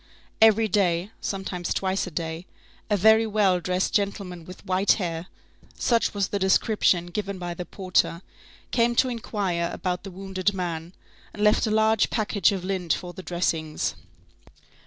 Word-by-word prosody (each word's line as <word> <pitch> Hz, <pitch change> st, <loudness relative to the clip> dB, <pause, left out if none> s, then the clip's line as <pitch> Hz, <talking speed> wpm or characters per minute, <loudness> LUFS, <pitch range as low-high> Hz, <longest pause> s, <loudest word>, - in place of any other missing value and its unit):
Every 220 Hz, 0 st, +6 dB
day, 185 Hz, -1 st, +1 dB
sometimes 190 Hz, -3 st, -3 dB
twice 190 Hz, 0 st, -1 dB
a -, -, -4 dB
day, 165 Hz, +1 st, -5 dB, 0.4 s
a 205 Hz, -, +2 dB
very 220 Hz, +3 st, +5 dB
well 200 Hz, -4 st, +2 dB
dressed 180 Hz, +1 st, -1 dB
gentleman 195 Hz, -4 st, -2 dB
with 185 Hz, +3 st, -12 dB
white 190 Hz, +1 st, +3 dB
hair,—such 180 Hz, +6 st, -3 dB
was 200 Hz, -2 st, 0 dB
the 200 Hz, -, -1 dB
description 190 Hz, -2 st, +2 dB
given 200 Hz, 0 st, -3 dB
by 175 Hz, -1 st, -4 dB
the 175 Hz, +1 st, -6 dB
porter,—came 195 Hz, +5 st, -1 dB
to 255 Hz, -, +3 dB
inquire 195 Hz, -7 st, -2 dB
about 180 Hz, -1 st, -3 dB
the 195 Hz, -, -7 dB
wounded 190 Hz, +1 st, -2 dB
man, 170 Hz, -2 st, -4 dB, 0.4 s
and 210 Hz, -, -3 dB
left 210 Hz, +2 st, +4 dB
a -, -, 0 dB
large 220 Hz, 0 st, +3 dB
package 210 Hz, -5 st, +2 dB
of 190 Hz, -3 st, -3 dB
lint 185 Hz, -3 st, 0 dB
for 175 Hz, -1 st, -5 dB
the 185 Hz, -, -8 dB
dressings. 165 Hz, -3 st, -1 dB
190 Hz, 150 wpm, -25 LUFS, 175-210 Hz, 0.4 s, Every